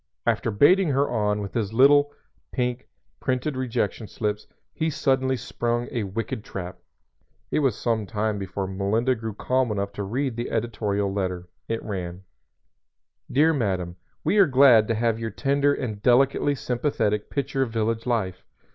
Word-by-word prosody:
After -, -, +1 dB
baiting 165 Hz, -, +4 dB
her 140 Hz, +1 st, +2 dB
on 105 Hz, -3 st, 0 dB
with 100 Hz, -, -7 dB
his 110 Hz, -3 st, -2 dB
little, 145 Hz, +4 st, +5 dB, 0.4 s
pink, 125 Hz, -1 st, -2 dB, 0.3 s
printed 130 Hz, +3 st, -1 dB
rejection 115 Hz, -4 st, -2 dB
slips, 105 Hz, 0 st, -3 dB, 0.3 s
he 160 Hz, 0 st, -1 dB
suddenly 130 Hz, -2 st, +1 dB
sprung 120 Hz, 0 st, -2 dB
a 120 Hz, -6 st, -2 dB
wicked 110 Hz, +4 st, -4 dB
trap. 90 Hz, -2 st, -7 dB, 0.7 s
It -, -, +2 dB
was 135 Hz, -7 st, +1 dB
some 110 Hz, -3 st, -1 dB
time 105 Hz, 0 st, -1 dB
before 95 Hz, 0 st, -3 dB
Melinda 100 Hz, +7 st, 0 dB
grew 110 Hz, -3 st, -5 dB
calm 130 Hz, +1 st, 0 dB
enough 100 Hz, -1 st, -2 dB
to 100 Hz, -, -4 dB
read 120 Hz, +4 st, -2 dB
the 120 Hz, -, -3 dB
editorial 105 Hz, -3 st, -1 dB
letter. 90 Hz, -2 st, -3 dB, 0.2 s
It 115 Hz, 0 st, -3 dB
ran: 90 Hz, -3 st, -5 dB, 1.1 s
_"Dear 155 Hz, +4 st, +4 dB
Madam 95 Hz, -, -1 dB, 0.3 s
We 210 Hz, -, +2 dB
are 195 Hz, -, +7 dB
glad 130 Hz, -5 st, +6 dB
to 115 Hz, -, 0 dB
have 115 Hz, 0 st, 0 dB
your 115 Hz, -1 st, -3 dB
tender 140 Hz, +5 st, +1 dB
and 110 Hz, -7 st, -3 dB
delicately 135 Hz, +4 st, +3 dB
sympathetic 120 Hz, -5 st, -1 dB
picture 140 Hz, -1 st, -2 dB
of 130 Hz, -, +1 dB
village 115 Hz, +1 st, -1 dB
life. 95 Hz, -7 st, -1 dB
115 Hz, 155 wpm, -25 LUFS, 105-130 Hz, 1.1 s, are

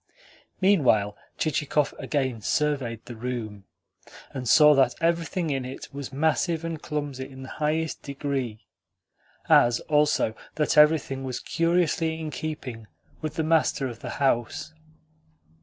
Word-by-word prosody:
Meanwhile 130 Hz, -, +3 dB, 0.2 s
Chichikov 150 Hz, -1 st, 0 dB
again 130 Hz, -6 st, -1 dB
surveyed 130 Hz, -3 st, -1 dB
the 120 Hz, -, -8 dB
room, 110 Hz, -4 st, -5 dB, 0.7 s
and 125 Hz, -3 st, -3 dB
saw 150 Hz, -1 st, +8 dB
that 135 Hz, -3 st, +3 dB
everything 165 Hz, 0 st, 0 dB
in 135 Hz, -2 st, -1 dB
it 130 Hz, +2 st, -8 dB
was 140 Hz, -2 st, -6 dB
massive 160 Hz, +3 st, 0 dB
and 165 Hz, -2 st, -4 dB
clumsy 145 Hz, -3 st, -4 dB
in 130 Hz, -1 st, -10 dB
the 130 Hz, -, -9 dB
highest 155 Hz, +1 st, 0 dB
degree; 135 Hz, -6 st, -4 dB, 0.8 s
as 120 Hz, 0 st, +5 dB
also 150 Hz, -7 st, +2 dB, 0.2 s
that 150 Hz, -1 st, +1 dB
everything 150 Hz, -3 st, +4 dB
was 130 Hz, -2 st, -3 dB
curiously 165 Hz, -1 st, +1 dB
in 155 Hz, -1 st, -4 dB
keeping 135 Hz, -9 st, -6 dB, 0.3 s
with 155 Hz, -1 st, -4 dB
the 160 Hz, -, 0 dB
master 155 Hz, -4 st, +2 dB
of 120 Hz, -3 st, -8 dB
the -, -, -6 dB
house. 135 Hz, +2 st, 0 dB
145 Hz, 130 wpm, -26 LUFS, 125-155 Hz, 0.8 s, saw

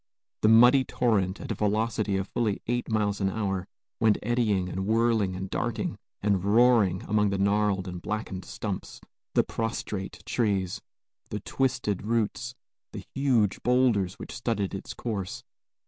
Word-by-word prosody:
The -, -, +4 dB
muddy 120 Hz, +4 st, +7 dB
torrent, 105 Hz, -7 st, 0 dB
at -, -, -5 dB
a -, -, +1 dB
velocity 105 Hz, -1 st, 0 dB
of 95 Hz, 0 st, -2 dB
fully 115 Hz, -4 st, 0 dB
eight 120 Hz, +1 st, -1 dB
miles 105 Hz, -2 st, 0 dB
an 95 Hz, -, +2 dB
hour, 95 Hz, -3 st, -2 dB, 0.3 s
went 110 Hz, -2 st, +4 dB
eddying 105 Hz, -5 st, +1 dB
and 95 Hz, +2 st, -3 dB
whirling 110 Hz, -4 st, +2 dB
and 95 Hz, +1 st, -4 dB
darting -, -, -2 dB, 0.3 s
and 100 Hz, -3 st, +2 dB
roaring 105 Hz, -3 st, +4 dB
among 105 Hz, 0 st, +2 dB
the 100 Hz, -, -1 dB
gnarled 100 Hz, -1 st, +1 dB
and 90 Hz, -1 st, -6 dB
blackened 105 Hz, -3 st, -4 dB
stumps, -, -, -5 dB, 0.4 s
the -, -, +5 dB
prostrate 110 Hz, -4 st, -4 dB
trees, 100 Hz, -6 st, 0 dB, 0.5 s
the 105 Hz, -, -3 dB
twisted 125 Hz, -6 st, -1 dB
roots, 115 Hz, +2 st, -1 dB, 0.4 s
the -, -, -6 dB
huge 125 Hz, -7 st, +2 dB
bowlders 120 Hz, -7 st, +2 dB
which -, -, -9 dB
studded 115 Hz, -5 st, -2 dB
its 95 Hz, -, -6 dB
course. 100 Hz, -6 st, -4 dB
105 Hz, 145 wpm, -27 LUFS, 95-115 Hz, 0.5 s, muddy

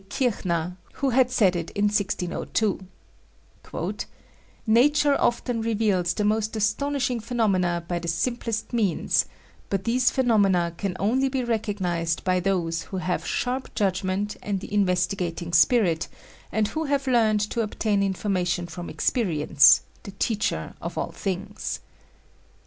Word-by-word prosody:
Kirchner, 180 Hz, -, -1 dB, 0.2 s
who 275 Hz, -2 st, -1 dB
had 255 Hz, 0 st, +4 dB
said 200 Hz, -8 st, +3 dB
it 170 Hz, -1 st, -3 dB
in 205 Hz, -, 0 dB
1602: 205 Hz, 0 st, 0 dB, 1.9 s
"Nature 285 Hz, +6 st, +4 dB
often 240 Hz, -1 st, 0 dB
reveals 210 Hz, -6 st, +1 dB
the 210 Hz, -, 0 dB
most 215 Hz, +1 st, 0 dB
astonishing 245 Hz, +4 st, 0 dB
phenomena 195 Hz, -7 st, 0 dB
by 175 Hz, -1 st, -1 dB
the 170 Hz, -, -7 dB
simplest 230 Hz, +7 st, -2 dB
means, 210 Hz, -7 st, +2 dB, 0.4 s
but 195 Hz, -1 st, -1 dB
these 245 Hz, +1 st, +3 dB
phenomena 200 Hz, -9 st, +2 dB
can 185 Hz, 0 st, -3 dB
only 255 Hz, +7 st, +2 dB
be 260 Hz, -1 st, -1 dB
recognized 190 Hz, -8 st, -1 dB
by 185 Hz, -1 st, +2 dB
those 175 Hz, -3 st, 0 dB
who 190 Hz, -, -6 dB
have 180 Hz, 0 st, -2 dB
sharp 255 Hz, +1 st, -2 dB
judgment 195 Hz, 0 st, -1 dB
and 200 Hz, -2 st, -2 dB
the 200 Hz, -, -9 dB
investigating 180 Hz, -3 st, 0 dB
spirit, 170 Hz, -2 st, +4 dB, 0.4 s
and 215 Hz, -1 st, +1 dB
who 315 Hz, +5 st, -2 dB
have 280 Hz, -1 st, 0 dB
learned 225 Hz, -5 st, +3 dB
to 235 Hz, -, 0 dB
obtain 215 Hz, -1 st, 0 dB
information 185 Hz, -3 st, 0 dB
from 175 Hz, +1 st, -7 dB
experience, 155 Hz, -, +4 dB, 0.2 s
the 200 Hz, -, -9 dB
teacher 210 Hz, +1 st, -1 dB
of -, -, -6 dB
all -, -, -2 dB
things." 190 Hz, -1 st, -4 dB
205 Hz, 130 wpm, -25 LUFS, 180-235 Hz, 1.9 s, had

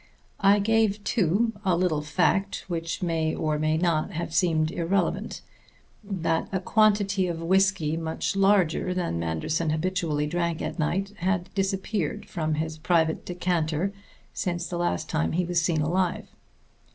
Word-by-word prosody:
I 200 Hz, +1 st, +5 dB
gave, 215 Hz, 0 st, +2 dB
too, 215 Hz, +3 st, +1 dB
a 185 Hz, -3 st, +2 dB
little 170 Hz, -4 st, +1 dB
fact 180 Hz, +6 st, 0 dB
which 165 Hz, -1 st, -3 dB
may 160 Hz, -2 st, 0 dB
or 155 Hz, -1 st, -1 dB
may 155 Hz, +1 st, +1 dB
not 170 Hz, +2 st, 0 dB
have 165 Hz, 0 st, -4 dB
seemed 160 Hz, -2 st, +2 dB
irrelevant: 175 Hz, +2 st, -1 dB, 0.6 s
that 170 Hz, -5 st, -1 dB
a 190 Hz, -, 0 dB
quantity 205 Hz, -1 st, +2 dB
of 170 Hz, -2 st, -3 dB
whisky 180 Hz, -2 st, +2 dB
much 160 Hz, +3 st, -2 dB
larger 195 Hz, -3 st, +2 dB
than 170 Hz, -, -1 dB
Manderson 85 Hz, -, -1 dB
habitually 160 Hz, -2 st, 0 dB
drank 170 Hz, +1 st, -1 dB
at -, -, -4 dB
night 195 Hz, +6 st, 0 dB
had 180 Hz, 0 st, -1 dB
disappeared 195 Hz, -3 st, -1 dB
from 155 Hz, -3 st, -2 dB
his 160 Hz, 0 st, -3 dB
private 160 Hz, -1 st, +1 dB
decanter 175 Hz, 0 st, -1 dB, 0.4 s
since 175 Hz, -2 st, -2 dB
the 175 Hz, -2 st, -4 dB
last 130 Hz, -, -1 dB
time 80 Hz, +1 st, -1 dB
he 180 Hz, +1 st, +1 dB
was 175 Hz, 0 st, +1 dB
seen 165 Hz, -2 st, +1 dB
alive. 175 Hz, +3 st, 0 dB
175 Hz, 145 wpm, -26 LUFS, 160-190 Hz, 0.6 s, I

